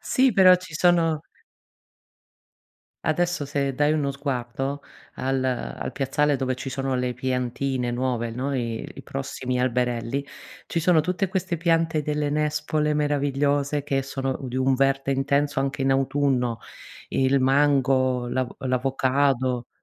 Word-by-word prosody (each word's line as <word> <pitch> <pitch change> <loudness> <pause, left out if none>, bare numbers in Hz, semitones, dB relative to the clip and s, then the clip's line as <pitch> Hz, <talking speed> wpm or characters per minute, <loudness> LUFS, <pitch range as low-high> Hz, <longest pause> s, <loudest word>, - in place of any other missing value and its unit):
Sì, 260 -2 +2
però 185 -2 +7
ci 180 -3 -11
sono 165 -2 +3 1.8
Adesso 170 -1 0
se 140 -1 -1
dai 145 +3 +2
uno 145 -3 0
sguardo 135 0 -3 0.3
al 130 0 -1
al 130 -2 -3
piazzale 145 +2 +1
dove 130 -1 -1
ci 130 +1 -6
sono 135 0 -2
le 125 0 -1
piantine 125 0 -2
nuove, 120 -1 -1
no, 130 +4 -3
i 115 -3 -3
i - - -10
prossimi 130 -2 -4
alberelli, 125 +1 0 0.4
ci 165 - -1
sono 165 -1 +4
tutte 180 +4 -1
queste 185 -2 -2
piante 165 -1 +1
delle 150 0 -1
nespole 150 0 0
meravigliose, 145 0 0
che 135 -2 0
sono 135 0 -3
u 130 - -6
di 125 - -5
un 130 +1 +3
verde 135 +1 +1
intenso 140 +1 +1
anche 135 0 -2
in 135 0 +3
autunno: 135 -3 +1 0.5
il 135 0 +2
mango, 130 -2 +2
l'avo 130 0 -2
l'avocado. 130 -1 0
135 Hz, 135 wpm, -24 LUFS, 130-150 Hz, 1.8 s, però